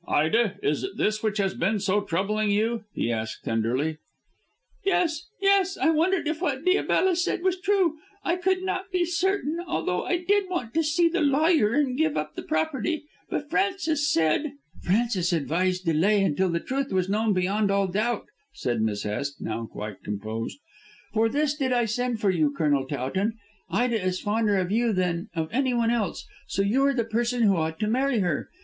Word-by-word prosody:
"Ida, 205 +7 +2
is 150 - +1
it 385 - -5
this 215 0 0
which 215 -1 -1
has 195 -2 +1
been 200 +5 0
so 200 +1 +1
troubling 205 +3 0
you?" 220 +2 0
he 120 - -1
asked 110 -1 -4
tenderly. 125 +8 0 0.8
"Yes! 350 -5 +1
Yes! 390 -1 +3
I 320 - +3
wondered 335 +2 +1
if 315 +1 -2
what 290 -5 -1
Diabella 370 0 +3
said 350 0 -1
was 370 -1 0
true. 375 -5 +2 0.3
I 345 - +1
could 370 +1 +1
not 375 0 -2
be 360 -1 +2
certain, 345 -2 0
although 180 - -1
I 355 - 0
did 385 +2 +1
want 250 -11 -3
to 325 - +2
see 315 +3 +3
the 350 +2 0
lawyer 290 -4 +3
and 280 -3 +1
give 315 -2 +2
up 150 0 -3
the - - -6
property. 315 0 -1 0.3
But 295 +1 -4
Frances 330 -6 +1
said 165 - +1
" 155 - -21
"Frances 195 -2 +1
advised 180 +4 0
delay 190 +6 +3
until 185 +1 +1
the 170 0 0
truth 270 +7 -3
was 185 -1 +1
known 215 +2 +1
beyond 195 +3 +1
all 200 0 +2
doubt," 215 +6 -1 0.3
said 120 -3 -1
Miss 105 -2 -1
Hest, 140 +7 -3
now 115 +1 -4
quite 105 -2 -7
composed. 110 - -4 0.6
"For 225 0 +3
this 290 +3 +1
did 270 -4 -1
I 240 -1 +2
send 240 +1 -1
for 205 -2 +2
you, 160 -5 +2
Colonel 145 -3 +1
Towton. 155 - -1 0.4
Ida 235 -4 +1
is 185 0 -1
fonder 210 -1 +1
of 185 0 -1
you 230 +1 +2
than 180 -2 -1
of 160 -1 -1
anyone 240 -2 +1
else, 220 -7 -1 0.2
so 195 - 0
you 235 +7 +2
are 280 - +2
the 235 - +1
person 235 +2 0
who 200 -3 +4
ought 160 -1 -1
to 210 - +1
marry 260 +3 +1
her. 175 -6 -1
220 Hz, 190 wpm, -26 LUFS, -, 0.8 s, who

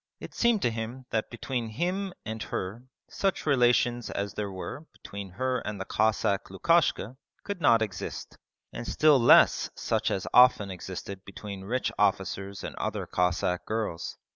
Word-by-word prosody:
It - - -9
seemed 235 -4 +2
to 120 - +2
him 115 +3 -5
that 110 -1 -1
between 120 -1 -4
him 180 - -2
and 110 0 -5
her 105 +7 -4 0.2
such 195 -1 -1
relations 120 -3 +3
as 100 -1 -3
there 105 -1 -3
were 120 - -7
between 100 -1 -8
her 130 +5 -1
and 105 -3 -5
the - - -4
Cossack 105 -2 +1
Lukashka 130 - +1 0.3
could 200 -3 -5
not 115 -5 +5
exist, 95 -5 -6 0.4
and 120 - -6
still 150 -3 +5
less 120 - +6
such - - 0
as 95 - -2
often 125 -6 +6
existed 95 +2 -7
between 100 0 -8
rich 125 +5 -1
officers 100 0 0
and - - -6
other - - -2
Cossack 90 0 0
girls. 110 -6 -3
110 Hz, 155 wpm, -28 LUFS, 100-130 Hz, 0.4 s, less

